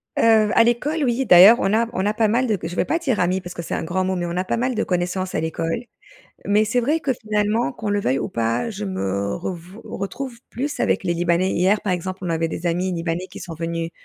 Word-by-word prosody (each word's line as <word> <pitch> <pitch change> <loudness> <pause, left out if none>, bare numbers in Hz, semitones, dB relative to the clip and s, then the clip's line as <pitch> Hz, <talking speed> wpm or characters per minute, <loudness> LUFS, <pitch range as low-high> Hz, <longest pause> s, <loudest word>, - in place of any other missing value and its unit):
Heu, 220 -2 +4
à - - +7
l'école, 285 +7 0
oui. 255 +1 +1
D'ailleurs 195 +3 +9
on 195 -3 +1
a 230 +1 +2
on 190 - -1
a 210 - +1
pas 220 0 +2
mal 240 +4 +1
de 215 -3 +1
je 165 +2 -4
vais - - +1
pas 330 - 0
dire 265 - -1
«amis» 180 +1 +1
parce 175 -1 -8
que - - -6
c'est 165 - -4
un - - -3
grand 185 +3 -1
mot, 190 0 -1
mais 175 -1 -2
on 170 - -4
n'a 180 +1 -1
pas 185 - -1
mal 255 +2 0
de 225 - 0
connaissances 180 +1 -2
à - - +1
l'école, 165 +6 -2 0.6
mais 210 +1 +3
c'est 230 +3 +1
vrai 295 +7 +1
que, 275 - 0
finalement, 215 0 0
qu'on 220 -4 -5
le 205 0 +1
veuille 135 -8 0
ou - - -3
pas, 115 - -1
je 210 -1 -5
me 100 - -2
revou 180 +3 -7
retrouve 235 +6 -5
plus 285 +4 -4
avec - - +1
les 175 -1 0
libanais. 175 +2 +1
Hier 190 +4 +2
par 195 - 0
exemple 185 +1 -4
on 180 - -2
avait 165 0 0
des 165 +2 -5
amis 180 +2 0
libanais 170 +1 -3
qui - - -9
sont 175 -3 -7
venus 165 0 -3
190 Hz, 260 wpm, -22 LUFS, 170-225 Hz, 0.6 s, D'ailleurs